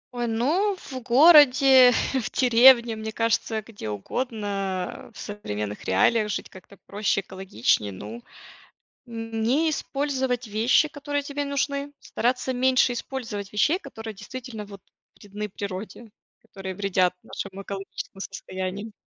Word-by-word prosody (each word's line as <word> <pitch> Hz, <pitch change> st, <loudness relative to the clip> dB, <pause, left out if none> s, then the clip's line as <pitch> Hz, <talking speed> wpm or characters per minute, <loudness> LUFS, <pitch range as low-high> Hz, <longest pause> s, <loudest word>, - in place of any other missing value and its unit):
Ой, 240 Hz, -1 st, -1 dB
ну, 310 Hz, -, +1 dB
в 270 Hz, -8 st, -8 dB
городе, 265 Hz, -1 st, +7 dB, 0.2 s
в 260 Hz, -4 st, -1 dB
деревне, 240 Hz, -1 st, +6 dB
мне 220 Hz, 0 st, -5 dB
кажется, 225 Hz, -1 st, 0 dB
где 205 Hz, -, -8 dB
угодно, 195 Hz, -, -4 dB
в 210 Hz, -, -17 dB
современных 105 Hz, -, -5 dB
реалиях 210 Hz, -, +2 dB
жить -, -, -4 dB
как-то 190 Hz, +1 st, -15 dB
проще, 205 Hz, -1 st, 0 dB
экологичнее. 185 Hz, -, -1 dB
Ну, 105 Hz, +5 st, -8 dB, 0.8 s
не 230 Hz, +5 st, -1 dB
использовать 265 Hz, -4 st, -2 dB
вещи, 225 Hz, +8 st, +3 dB
которые 290 Hz, -1 st, -3 dB
тебе 285 Hz, 0 st, -4 dB
нужны, 280 Hz, 0 st, -2 dB
стараться 250 Hz, +2 st, -1 dB
меньше 255 Hz, 0 st, +3 dB
использовать 230 Hz, -6 st, -5 dB
вещей, 300 Hz, -, +2 dB
которые 225 Hz, -, -9 dB
действительно 225 Hz, +2 st, -8 dB
вот 200 Hz, -1 st, -12 dB, 0.4 s
вредны 210 Hz, +1 st, -6 dB
природе, 205 Hz, +4 st, -7 dB, 0.3 s
которые 190 Hz, -1 st, -8 dB
вредят 185 Hz, -2 st, +1 dB
нашему 195 Hz, -1 st, -7 dB
экологическому 195 Hz, 0 st, -7 dB
состоянию. 195 Hz, +2 st, -6 dB
225 Hz, 120 wpm, -25 LUFS, 195-260 Hz, 0.8 s, городе